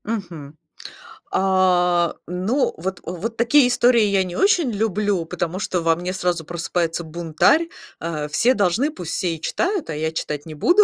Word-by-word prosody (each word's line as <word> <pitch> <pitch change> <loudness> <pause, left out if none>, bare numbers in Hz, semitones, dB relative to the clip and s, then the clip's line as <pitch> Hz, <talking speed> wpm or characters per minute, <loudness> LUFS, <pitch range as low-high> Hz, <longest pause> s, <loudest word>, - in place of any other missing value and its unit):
Мгм. 170 -9 -6 0.7
А, 180 -2 +2
ну 190 - 0
вот, 185 +2 -4
вот 185 +7 -5
такие 245 +3 +5
истории 245 -1 +4
я 200 -2 +2
не 180 -1 -6
очень 360 - +3
люблю, 205 -3 0
потому 175 +2 -3
что 185 -3 -1
во 165 0 +3
мне 180 +2 -4
сразу 180 -3 -1
просыпается 170 0 -2
бунтарь: 170 - +1 0.3
а, 155 -3 -3
все 230 +12 +3
должны, 205 - +1
пусть 180 - -6
все 175 -3 -1
и 160 - -13
читают, 370 - -1
а 155 - -3
я 160 +1 -2
читать 150 -2 -4
не 160 - -8
буду. 355 - +5
180 Hz, 165 wpm, -21 LUFS, 165-225 Hz, 0.7 s, такие